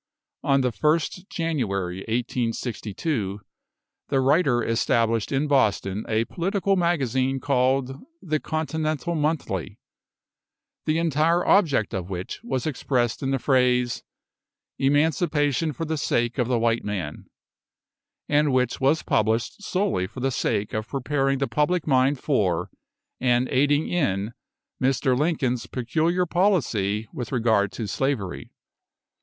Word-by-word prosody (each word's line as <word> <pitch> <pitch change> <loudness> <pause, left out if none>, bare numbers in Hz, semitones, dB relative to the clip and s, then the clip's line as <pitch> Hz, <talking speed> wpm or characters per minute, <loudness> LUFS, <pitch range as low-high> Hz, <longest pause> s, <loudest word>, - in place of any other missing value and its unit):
On 140 -2 +3
the 125 -1 +1
1st 155 - 0
January, 100 - -2
1862, 115 - -2 0.7
the 135 - +2
writer 135 -3 +3
established 115 -1 +1
in 140 +2 +1
Boston 105 -7 +1
a 110 +1 +1
political 195 - 0
magazine, 135 -7 +1
called 135 0 +1 0.2
"The 155 -3 -1
Continental 155 0 -2
Monthly," 155 -1 -2 1.1
the 155 +1 +1
entire 165 +1 +2
object 150 - +3
of 95 -1 -4
which 90 -1 -5
was 130 - -2
expressed 125 -5 -1
in 135 - -1
the 135 - +1
phrase, 125 -2 +2 0.8
Emancipation 145 +1 +2
for 165 +2 -4
the 160 0 -2
sake 120 -1 0
of 120 - +2
the 125 -1 +1
white 115 0 +1
man, 90 -8 -4 1.0
and 145 0 +3
which 125 -1 0
was 140 +4 +3
published 110 - 0
solely 190 - 0
for 130 - -10
the 135 +1 0
sake 105 -3 -1
of 110 0 -2
preparing 135 +1 0
the 135 0 0
public 160 +3 +1
mind 135 0 +3
for, 95 - 0 0.5
and 125 0 +2
aiding 145 +3 +2
in, 110 - -1 0.5
Mr. 130 0 +2
Lincoln's 130 -5 0
peculiar 160 +9 0
policy 125 - +1
with 120 - -5
regard 110 -5 +2
to 115 - -4
slavery. 110 -5 -2
135 Hz, 125 wpm, -24 LUFS, 115-155 Hz, 1.1 s, On